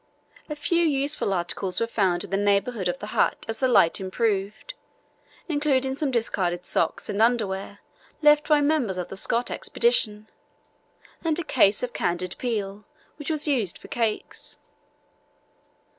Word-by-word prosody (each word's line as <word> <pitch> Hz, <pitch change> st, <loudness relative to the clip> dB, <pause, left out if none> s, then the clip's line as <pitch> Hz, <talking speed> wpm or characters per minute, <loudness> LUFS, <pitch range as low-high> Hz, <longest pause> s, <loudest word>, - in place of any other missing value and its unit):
A 300 Hz, -, -3 dB
few 340 Hz, +3 st, +1 dB
useful 285 Hz, -7 st, +2 dB
articles 180 Hz, +1 st, -2 dB
were 230 Hz, -, +1 dB
found 190 Hz, -6 st, +1 dB
in 200 Hz, -, -9 dB
the -, -, +1 dB
neighbourhood 200 Hz, +1 st, +1 dB
of 175 Hz, 0 st, -1 dB
the -, -, -7 dB
hut -, -, +1 dB
as 225 Hz, 0 st, -4 dB
the 260 Hz, -, +3 dB
light 200 Hz, -9 st, +4 dB
improved, 200 Hz, -, -2 dB, 0.7 s
including 285 Hz, -4 st, +1 dB
some 285 Hz, +1 st, -1 dB
discarded 185 Hz, -7 st, -1 dB
socks 165 Hz, -, 0 dB
and 205 Hz, -, -1 dB
underwear, 205 Hz, -4 st, 0 dB, 0.4 s
left 300 Hz, 0 st, +5 dB
by 300 Hz, -1 st, +5 dB
members 285 Hz, -10 st, +1 dB
of 180 Hz, -, -4 dB
the -, -, -7 dB
Scott 230 Hz, +5 st, -1 dB
Expedition, 215 Hz, -, +1 dB, 1.0 s
and 325 Hz, -2 st, +1 dB
a 350 Hz, -, 0 dB
case 205 Hz, -8 st, +3 dB
of 245 Hz, -1 st, -3 dB
candied 175 Hz, +1 st, -2 dB
peel, 210 Hz, -4 st, -3 dB, 0.3 s
which 295 Hz, 0 st, -6 dB
was 310 Hz, -1 st, 0 dB
used 235 Hz, -, 0 dB
for -, -, -14 dB
cakes. 225 Hz, -3 st, -2 dB
225 Hz, 150 wpm, -25 LUFS, 195-285 Hz, 1.0 s, left